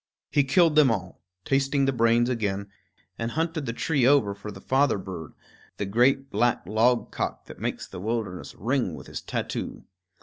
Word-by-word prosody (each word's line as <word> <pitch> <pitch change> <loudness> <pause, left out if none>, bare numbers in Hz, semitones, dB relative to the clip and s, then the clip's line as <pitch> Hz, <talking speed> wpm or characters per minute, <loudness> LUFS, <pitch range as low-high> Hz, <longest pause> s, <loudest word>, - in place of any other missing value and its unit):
He 145 - +4
killed 165 +3 +4
them 150 -3 +6
all, 95 -5 -3 0.2
tasting 135 0 +2
the 135 - +1
brains 115 0 +3
again, 100 -5 -2 0.5
and 115 0 -1
hunted 160 +1 -2
the - - 0
tree 140 +2 0
over 125 -6 +4
for 100 +1 -9
the - - -10
father 135 -2 +2
bird, 90 -5 -7 0.4
the 100 - -2
great 130 +7 +2
black 120 -5 +1
logcock 115 +5 0
that - - -11
makes - - -3
the - - -8
wilderness 105 -4 -3
ring 120 - -1
with 65 - -10
his - - -6
tattoo. - - -4
120 Hz, 170 wpm, -26 LUFS, 100-135 Hz, 0.5 s, them